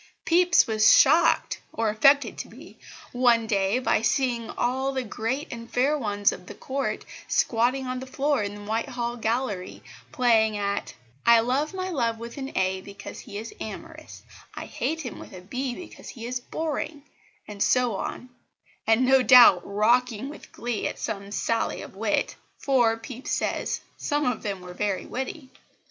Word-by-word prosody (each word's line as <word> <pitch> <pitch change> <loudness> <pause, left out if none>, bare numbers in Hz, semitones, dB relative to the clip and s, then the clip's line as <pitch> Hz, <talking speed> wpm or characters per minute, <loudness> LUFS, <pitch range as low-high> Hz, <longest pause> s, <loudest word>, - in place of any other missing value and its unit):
Pepys 350 0 +5
was 220 -1 +5
shocked 315 +5 +4
or 225 -1 0
affected 275 +7 +4
to - - -5
be - - -14 0.3
one 240 -2 +3
day 200 0 +1
by 255 - +1
seeing 235 -1 0
all 260 +3 -1
the 260 -1 -2
great 245 +6 -3
and 230 0 -9
fair 270 +5 +2
ones 205 -7 +1
of 180 0 -10
the 205 - -9
Court 270 +5 -3 0.2
squatting 250 +3 +1
on 255 0 -3
the 260 - -8
floor 280 0 0
in 205 0 -4
the 205 - -10
Whitehall 235 +2 -2
gallery 225 -4 -2 0.3
playing 225 -5 +3
at 200 0 -3 0.3
"I 235 -1 +6
love 275 +8 -1
my 370 0 -3
love 235 -7 0
with 235 +3 -9
an 270 +1 -5
A 190 0 0
because 200 +1 -10
he 205 - -8
is 225 +2 -7
Amorous"; 215 - -9 0.3
"I - - -6
hate 325 +1 -3
him 245 -7 -7
with - - -11
a 185 - -9
B 250 +6 -4
because 355 - -10
he 230 -3 -8
is 250 +1 -3
Boring," 300 +2 -4 0.4
and 205 -1 -8
so 250 -2 +2
on; 250 +5 -5 0.6
and 225 +3 +4
no 265 +1 +5
doubt 240 -7 +8
rocking 235 +4 +1
with 300 - -12
glee 235 -3 -3
at - - -5
some 200 -1 -5
sally 225 +2 -1
of - - -12
wit, 210 +1 -1 0.2
for, 240 -5 +2
Pepys 250 +3 -8
says, - - -1 0.2
"some 295 0 -1
of 250 -3 -1
them 200 -3 -4
were 180 0 -9
very 200 0 -2
witty." 260 +1 -6
235 Hz, 170 wpm, -26 LUFS, 215-265 Hz, 0.6 s, doubt